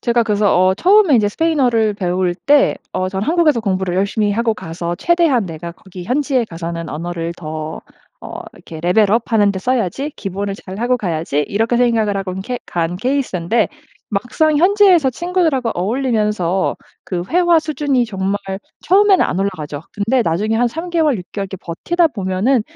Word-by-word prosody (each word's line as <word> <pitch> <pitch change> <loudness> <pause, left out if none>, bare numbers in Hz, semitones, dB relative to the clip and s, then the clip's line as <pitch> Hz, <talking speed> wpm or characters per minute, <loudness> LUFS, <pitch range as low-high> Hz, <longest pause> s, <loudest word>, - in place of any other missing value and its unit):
제가 235 -1 +2
그래서 210 -2 +2
어 185 +1 +4
처음에 375 - +4
인제 210 -4 +3
스페인어를 245 -6 +1
배울 180 -2 -1
때, 285 +11 +3 0.2
어 185 - -1
저는 190 +2 -3
'한국에서 320 -6 +3
공부를 190 -4 -1
열심히 205 +2 +1
하고 225 +1 0
가서 170 -2 -5
최대한 330 - +2
내가 170 0 -7
거기 185 0 -11
현지에 260 +2 +1
가서는 170 -3 -6
언어를 170 +2 -4
더 155 -1 -6 0.4
어 - - -7
이렇게 160 - -11
레벨 195 +5 +3
업 230 +2 0
하는데 205 -3 +3
써야지. 255 - -1
기본을 200 0 -4
잘하고 220 +6 -2
가야지.' 165 - -2
이렇게 225 +4 0
생각을 230 -4 +2
하고 195 -1 -3
케 245 +6 -4
간 170 0 -2
케이스인데 230 -4 0 0.4
막상 250 +9 +1
현지에서 365 -5 +5
친구들하고 320 -5 0
어울리면서 210 -3 0 0.3
그 180 -2 -3
회화 345 -1 +4
수준이 295 -5 0
정말 195 -2 -2 0.5
처음에는 390 +1 +5
안 180 - -2
올라가죠. 155 -7 -4
근데 225 +5 +1
나중에 205 +5 0
한 240 +2 +2
3 325 +8 -6
개월, 315 -6 +2
6 180 - -7
개월 200 -1 -3
이렇게 190 - -7
버티다 335 - 0
보면은 200 +5 +1
215 Hz, 375 characters per minute, -18 LUFS, 185-265 Hz, 0.5 s, 현지에서